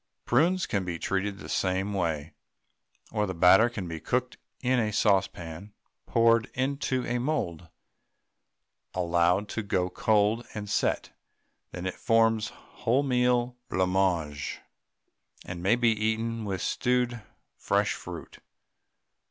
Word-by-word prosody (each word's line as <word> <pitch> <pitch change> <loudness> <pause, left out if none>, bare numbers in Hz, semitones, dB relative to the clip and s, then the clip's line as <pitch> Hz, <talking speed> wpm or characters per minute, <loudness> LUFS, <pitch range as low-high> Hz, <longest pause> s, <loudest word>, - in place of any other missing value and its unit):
Prunes 170 +9 +3
can 100 -2 -1
be 90 -2 -3
treated 95 +3 -2
the - - -10
same 95 +2 0
way, 80 -5 -2 0.8
or 105 -2 0
the 95 - -4
batter 95 +7 +6
can 100 -7 -5
be 80 -1 -5
cooked - - -1 0.2
in 125 -1 +2
the 105 - -1
saucepan, 100 -2 0 0.3
poured 115 -1 +3
into 130 -1 -1
a 120 0 -1
mould, 90 - -2 1.3
allowed 90 +2 +2
to 110 - -2
go 90 -3 -1
cold 110 +3 +2
and 105 -1 -5
set; - - 0 0.6
then 90 0 -7
it 95 - -1
forms 115 -1 +2 0.3
wholemeal 125 -1 +2 0.2
blancmange, 90 -5 0 0.9
and 90 -1 -6
may 95 +6 +4
be 120 -1 +3
eaten 110 +1 -1
with 95 -2 -3
stewed 125 -1 0 0.3
fresh - - +1
fruit. - - -9
105 Hz, 120 wpm, -28 LUFS, 90-120 Hz, 1.3 s, batter